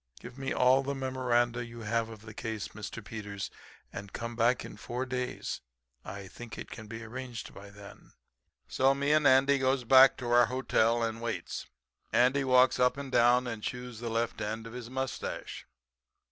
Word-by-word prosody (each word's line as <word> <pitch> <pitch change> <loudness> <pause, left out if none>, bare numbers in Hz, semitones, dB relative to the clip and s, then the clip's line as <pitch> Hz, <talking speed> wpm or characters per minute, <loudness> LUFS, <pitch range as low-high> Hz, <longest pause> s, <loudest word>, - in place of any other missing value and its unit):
Give 120 +1 -10
me 135 0 -4
all 130 +1 +4
the 140 +1 -3
memoranda 120 -2 0
you 115 0 -9
have 115 +1 -1
of 110 -2 -10
the 110 0 -10
case, 110 -1 -4
Mr. 110 +1 -8
Peters, 105 -3 -6 0.4
and 100 0 -7
come 115 +2 -5
back 120 +2 +2
in - - -9
four 125 +2 -4
days. 125 -1 -4 0.4
I 100 +1 -7
think 120 +4 -10
it - - -8
can 110 - -8
be 115 +1 -7
arranged 120 +1 -7
by 100 0 -11
then.' 100 0 -14 0.5
"So 135 +1 +3
me 140 +1 0
and 150 -1 +5
Andy 135 +1 +5
goes 130 0 +1
back 130 +2 +7
to 120 -1 -4
our 120 -1 +6
hotel 120 -2 +2
and 115 0 -2
waits. 110 -7 -4 0.4
Andy 130 +3 +3
walks 130 -1 +4
up 125 +2 +3
and 140 -2 -6
down 125 +1 +4
and 115 -3 -4
chews 125 0 -5
the 120 0 -4
left 115 0 -1
end 110 +2 -3
of 115 - -9
his 120 -2 -7
mustache. 130 0 -4
120 Hz, 185 wpm, -30 LUFS, 115-130 Hz, 0.5 s, back